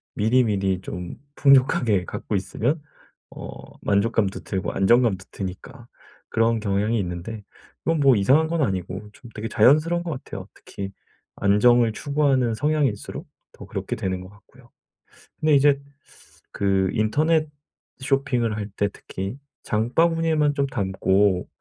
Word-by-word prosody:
미리미리 105 Hz, -5 st, +2 dB
좀 90 Hz, -2 st, -6 dB, 0.2 s
풍족하게 125 Hz, -8 st, +4 dB
갖고 105 Hz, -, -4 dB
있으면 125 Hz, -, -1 dB, 0.5 s
어 -, -, -9 dB, 0.4 s
만족감도 100 Hz, 0 st, +1 dB
들고 95 Hz, -1 st, -3 dB
안정감도 100 Hz, -1 st, +2 dB
드니까 115 Hz, +6 st, -8 dB, 0.4 s
그런 115 Hz, 0 st, +2 dB
경향이 105 Hz, +2 st, 0 dB
있는데 95 Hz, +4 st, -5 dB, 0.4 s
그건 165 Hz, -1 st, +1 dB
뭐 135 Hz, -3 st, +5 dB
이상한 135 Hz, +10 st, +4 dB
건 165 Hz, -1 st, 0 dB
아니고 95 Hz, -1 st, -3 dB
좀 120 Hz, +1 st, -14 dB
되게 110 Hz, +1 st, -4 dB
자연스러운 160 Hz, +5 st, +4 dB
것 170 Hz, -, -4 dB
같아요. 100 Hz, -8 st, -7 dB
특히 100 Hz, 0 st, -8 dB, 0.4 s
안정을 115 Hz, +3 st, +4 dB
추구하는 135 Hz, -4 st, +1 dB
성향일수록 145 Hz, -5 st, -1 dB, 0.2 s
더 -, -, -12 dB
그렇게 -, -, -4 dB
되는 95 Hz, -1 st, -3 dB
것 95 Hz, -, -11 dB
같고요. 120 Hz, +4 st, -21 dB, 0.7 s
근데 155 Hz, -1 st, +3 dB
이제 140 Hz, 0 st, +4 dB, 0.7 s
그 95 Hz, -1 st, +1 dB
인터넷 155 Hz, +8 st, +1 dB, 0.5 s
쇼핑을 130 Hz, -5 st, 0 dB
할 105 Hz, -1 st, -4 dB
때 100 Hz, -, +1 dB
특히 95 Hz, +7 st, -7 dB, 0.2 s
장바구니에만 155 Hz, +6 st, +1 dB
좀 140 Hz, -1 st, +1 dB
담고 95 Hz, -3 st, +1 dB
115 Hz, 295 characters per minute, -23 LUFS, 100-140 Hz, 0.7 s, 뭐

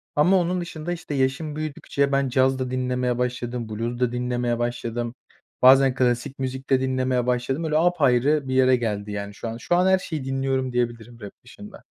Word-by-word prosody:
ama 180 Hz, +6 st, +4 dB
onun 180 Hz, +1 st, -1 dB
dışında 170 Hz, -1 st, -6 dB
işte 165 Hz, -3 st, -7 dB
yaşım 135 Hz, +3 st, -1 dB
büyüdükçe 140 Hz, -2 st, -2 dB
ben 140 Hz, -1 st, +1 dB
caz 130 Hz, +1 st, +2 dB
da 130 Hz, -1 st, -3 dB
dinlemeye 125 Hz, -1 st, -1 dB
başladım, 125 Hz, -1 st, -3 dB
Blues 115 Hz, +3 st, -4 dB
da 125 Hz, -1 st, +1 dB
dinlemeye 120 Hz, -1 st, -1 dB
başladım. 120 Hz, -1 st, -3 dB, 0.5 s
Bazen 135 Hz, 0 st, +6 dB
klasik 125 Hz, +1 st, 0 dB
müzik 130 Hz, 0 st, -4 dB
de 130 Hz, -1 st, +3 dB
dinlemeye 130 Hz, -1 st, 0 dB
başladım. 125 Hz, +5 st, -1 dB
Öyle 155 Hz, -1 st, +1 dB
apayrı 150 Hz, -4 st, +2 dB
bir 130 Hz, -, -2 dB
yere 130 Hz, 0 st, +5 dB
geldi 105 Hz, -4 st, -3 dB
yani 100 Hz, 0 st, -5 dB
şu 115 Hz, -, -7 dB
an. 115 Hz, 0 st, -5 dB
Şu 145 Hz, +9 st, 0 dB
an 180 Hz, +1 st, +3 dB
her 190 Hz, 0 st, +4 dB
şeyi 155 Hz, -7 st, -5 dB
dinliyorum 135 Hz, -1 st, -1 dB
diyebilirim, 120 Hz, -1 st, -3 dB
rap 100 Hz, -, -7 dB
dışında. 205 Hz, +11 st, -13 dB
130 Hz, 185 wpm, -24 LUFS, 120-140 Hz, 0.5 s, Bazen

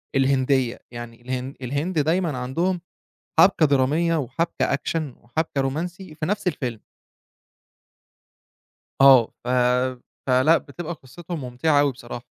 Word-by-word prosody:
الهندية، 130 Hz, -2 st, +2 dB
يعني 120 Hz, -1 st, -9 dB
الهن 130 Hz, +2 st, -4 dB
الهند 145 Hz, +7 st, -1 dB
دايمًا 160 Hz, -2 st, +1 dB
عندهم 170 Hz, +8 st, -1 dB, 0.6 s
حبكة 180 Hz, -4 st, +6 dB
درامية 150 Hz, +5 st, +2 dB
وحبكة 155 Hz, +1 st, -1 dB
Action 160 Hz, +4 st, -2 dB, 0.2 s
وحبكة 140 Hz, +3 st, -2 dB
رومانسي 165 Hz, +6 st, -4 dB
في 155 Hz, 0 st, -4 dB
نفْس 205 Hz, +2 st, -2 dB
الفيلم. 125 Hz, -10 st, -2 dB, 2.2 s
آه، 135 Hz, -4 st, +8 dB, 0.2 s
ف -, -, -9 dB, 0.8 s
فلأ 130 Hz, +6 st, +5 dB
بتبقى 165 Hz, +4 st, -7 dB
قصته 165 Hz, +5 st, -9 dB
ممتعة 145 Hz, +2 st, +1 dB
أوي 145 Hz, -1 st, +3 dB
بصراحة، 120 Hz, -1 st, -9 dB
140 Hz, 110 wpm, -23 LUFS, 130-165 Hz, 2.2 s, آه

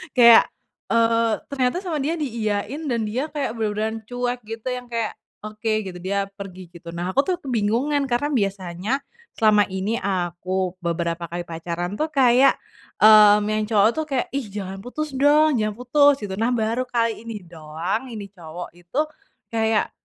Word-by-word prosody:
kayak, 235 Hz, -2 st, +9 dB, 0.4 s
eee, 230 Hz, -1 st, +3 dB, 0.2 s
ternyata 260 Hz, +3 st, 0 dB
sama 325 Hz, -5 st, -2 dB
dia 310 Hz, +5 st, -1 dB
diiyain 235 Hz, +1 st, -3 dB
dan 235 Hz, -3 st, 0 dB
dia 250 Hz, +8 st, -2 dB
kayak 285 Hz, -7 st, -3 dB
bener-beneran 220 Hz, +1 st, -1 dB
cuek 245 Hz, 0 st, -2 dB
gitu 225 Hz, +2 st, -7 dB
yang 250 Hz, -1 st, -5 dB
kayak, 230 Hz, -2 st, -2 dB, 0.3 s
"Oke," 215 Hz, 0 st, -2 dB
gitu, 180 Hz, -2 st, -7 dB
dia 195 Hz, +2 st, -2 dB
pergi 185 Hz, -3 st, -9 dB
gitu. 170 Hz, -1 st, -14 dB
Nah 175 Hz, +2 st, -2 dB
aku 275 Hz, -, +1 dB
tuh 365 Hz, -, +2 dB
kebingungan 260 Hz, +4 st, 0 dB
karena 265 Hz, +5 st, 0 dB
biasanya 195 Hz, -3 st, -2 dB, 0.4 s
selama 215 Hz, -2 st, +4 dB
ini 195 Hz, +5 st, -2 dB
aku 185 Hz, 0 st, -2 dB
beberapa 170 Hz, 0 st, -2 dB
kali 175 Hz, +1 st, -4 dB
pacaran 170 Hz, +3 st, -5 dB
tuh 310 Hz, -, +1 dB
kayak, 265 Hz, -2 st, +4 dB, 0.5 s
mmm, 210 Hz, -1 st, +8 dB
yang 215 Hz, 0 st, 0 dB
cowok 215 Hz, -1 st, +4 dB
tuh 315 Hz, +2 st, -3 dB
kayak, 270 Hz, -4 st, -1 dB
"Ih 270 Hz, -5 st, -3 dB
jangan 195 Hz, -1 st, -6 dB
putus 290 Hz, +7 st, -5 dB
dong, 290 Hz, 0 st, +4 dB
jangan 215 Hz, -1 st, -1 dB
putus," 280 Hz, +1 st, +3 dB
gitu. 190 Hz, -2 st, -4 dB
Nah 245 Hz, +2 st, +1 dB
baru 230 Hz, +3 st, -1 dB
kali 230 Hz, -1 st, -1 dB
ini 210 Hz, -4 st, -6 dB
doang 165 Hz, +8 st, -4 dB
ini 205 Hz, -5 st, -8 dB
cowok 175 Hz, -2 st, -8 dB
itu 175 Hz, -, -4 dB, 0.5 s
kayak, 220 Hz, -1 st, +1 dB
220 Hz, 160 wpm, -23 LUFS, 190-250 Hz, 0.5 s, kayak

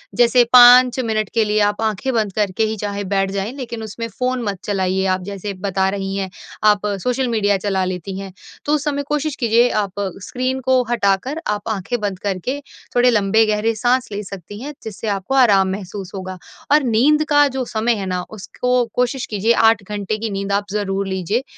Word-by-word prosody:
जैसे 240 Hz, 0 st, +5 dB
5 250 Hz, +1 st, +8 dB
मिनट 215 Hz, -4 st, -1 dB
के 225 Hz, -2 st, +3 dB
लिए 210 Hz, 0 st, +1 dB
आप 205 Hz, +1 st, +1 dB
आँखें 220 Hz, +4 st, -1 dB
बंद 215 Hz, -4 st, 0 dB
करके 210 Hz, 0 st, 0 dB
ही 220 Hz, 0 st, -2 dB
चाहे 205 Hz, 0 st, -3 dB
बैठ 195 Hz, -1 st, +1 dB
जाएँ 200 Hz, +3 st, -3 dB
लेकिन 235 Hz, -4 st, -6 dB
उसमें 230 Hz, +2 st, -5 dB
फ़ोन 250 Hz, +3 st, -2 dB
मत 200 Hz, -3 st, -2 dB
चलाइएँ। 190 Hz, -1 st, 0 dB
आप 185 Hz, 0 st, 0 dB
जैसे 200 Hz, +1 st, -5 dB
बता 190 Hz, -1 st, +1 dB
रही 195 Hz, 0 st, -3 dB
हैं 195 Hz, -1 st, -2 dB, 0.4 s
आप 210 Hz, 0 st, +2 dB, 0.2 s
सोशल 250 Hz, +1 st, 0 dB
मीडिया 205 Hz, -4 st, +1 dB
चला 190 Hz, -1 st, -1 dB
लेती 185 Hz, +1 st, -5 dB
हैं, 195 Hz, -1 st, -7 dB, 0.3 s
तो 295 Hz, -, +1 dB
उस 290 Hz, -, -2 dB
समय 285 Hz, -1 st, -1 dB
कोशिश 300 Hz, -1 st, -1 dB
कीजिए 235 Hz, 0 st, +3 dB
आप 195 Hz, -2 st, -5 dB, 0.3 s
स्क्रीन 255 Hz, +1 st, -2 dB
को 260 Hz, -1 st, +4 dB
हटाकर 235 Hz, +8 st, 0 dB
आप 210 Hz, +1 st, -2 dB
आँखें 220 Hz, +3 st, -2 dB
बंद 200 Hz, -3 st, -3 dB
करके 205 Hz, +8 st, -3 dB, 0.4 s
थोड़े 245 Hz, +1 st, +5 dB
लंबे 220 Hz, 0 st, +3 dB
गहरे 215 Hz, +1 st, 0 dB
साँस 250 Hz, +3 st, +1 dB
ले 205 Hz, +1 st, -3 dB
सकती 200 Hz, +1 st, -9 dB
हैं। 295 Hz, +2 st, -6 dB
जिससे 220 Hz, 0 st, -6 dB
आपको 200 Hz, +6 st, -2 dB
आराम 200 Hz, -7 st, +5 dB
महसूस 195 Hz, -1 st, -6 dB
होगा 185 Hz, -1 st, -6 dB, 0.3 s
और 295 Hz, -1 st, +5 dB
नींद 265 Hz, +7 st, +3 dB
का 290 Hz, -1 st, +5 dB
जो 265 Hz, -1 st, -3 dB
समय 230 Hz, +1 st, 0 dB
है 195 Hz, -2 st, -4 dB
ना 180 Hz, -1 st, -2 dB
उसको 245 Hz, +4 st, -1 dB
कोशिश 250 Hz, +1 st, 0 dB
कीजिए 215 Hz, +2 st, +2 dB
8 225 Hz, -3 st, +3 dB
घंटे 205 Hz, +1 st, -3 dB
की 225 Hz, 0 st, -3 dB
नींद 195 Hz, 0 st, -3 dB
आप 200 Hz, +1 st, +1 dB
ज़रूर 200 Hz, -1 st, -2 dB
लीजिए। 190 Hz, +6 st, -1 dB
215 Hz, 195 wpm, -19 LUFS, 195-245 Hz, 0.4 s, 5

